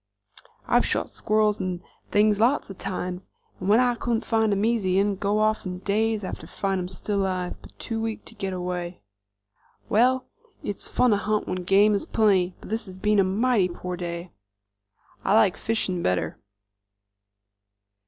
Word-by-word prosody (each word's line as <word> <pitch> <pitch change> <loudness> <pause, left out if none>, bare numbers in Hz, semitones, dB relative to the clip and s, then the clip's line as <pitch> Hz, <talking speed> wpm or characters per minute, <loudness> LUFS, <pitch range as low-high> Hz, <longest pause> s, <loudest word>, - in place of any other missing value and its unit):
"I've - - +4
shot - - -1
squirrels 215 -1 +1
'nd 185 -2 -2
such - - -32
things 210 0 +3
lots 240 -1 +2
of 190 - -11
times, 180 0 -4 0.3
'nd 185 - -2
when 215 +3 +6
I 250 -1 +3
couldn't 235 -1 -2
find 220 -2 +2
'em 200 +1 +1
easy, 200 -5 +2
I'd 200 -1 +1
go 205 +1 +1
off, 215 0 +2
'nd 180 0 -6
days 215 +1 +1
after 185 - -6
find 195 -1 -2
'em 180 - -4
still 200 +2 -2
alive, 185 -2 -2
but - - -16
too 225 -1 -3
weak 225 -1 -4
to - - -11
get 195 -3 -4
away." 180 -1 -4 0.9
"Well, 255 +4 +3 0.4
it's 205 - -4
fun 250 - +3
to 205 - +4
hunt 215 +1 -1
when 185 -1 -3
game 200 +3 +5
is 200 - -1
plenty, 190 -5 +2
but - - -12
this 220 0 -2
has 185 0 -9
been 210 +1 +2
a - - +6
mighty 200 0 +2
poor 180 +1 -5
day." 175 0 -5 0.9
"I 195 - +3
like 215 -4 +5
fishin' 195 -5 -1
better." 90 - -1
200 Hz, 175 wpm, -25 LUFS, 185-220 Hz, 0.9 s, when